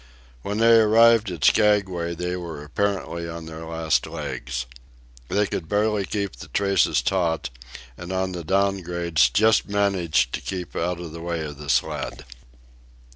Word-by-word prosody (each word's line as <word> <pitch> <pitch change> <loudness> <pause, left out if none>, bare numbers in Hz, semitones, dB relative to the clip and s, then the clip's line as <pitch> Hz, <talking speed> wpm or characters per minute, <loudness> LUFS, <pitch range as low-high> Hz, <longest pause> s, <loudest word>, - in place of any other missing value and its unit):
When 100 +7 -3
they 115 0 +6
arrived 110 0 +5
at 85 -5 -6
Skaguay 95 -5 +2
they 90 +1 -3
were 85 -5 -6
apparently 85 0 -2
on 85 0 -7
their 80 0 -8
last 80 -1 0
legs. 60 +1 -5 0.6
They 105 +2 +2
could 85 -4 -5
barely 105 -1 +1
keep 100 -6 -3
the - - -10
traces 100 -1 +2
taut, 85 -7 0 0.5
and 90 +1 -7
on 95 0 -1
the 90 -2 -5
down 95 +3 +1
grades 85 -2 +1
just 110 0 +3
managed 95 -11 +1
to - - -2
keep 90 -2 -6
out 90 +1 -1
of 85 -2 -7
the 85 +1 -8
way 85 -1 -3
of 75 -1 -8
the 75 -1 -8
sled. 65 +1 -1
90 Hz, 160 wpm, -24 LUFS, 80-100 Hz, 0.6 s, they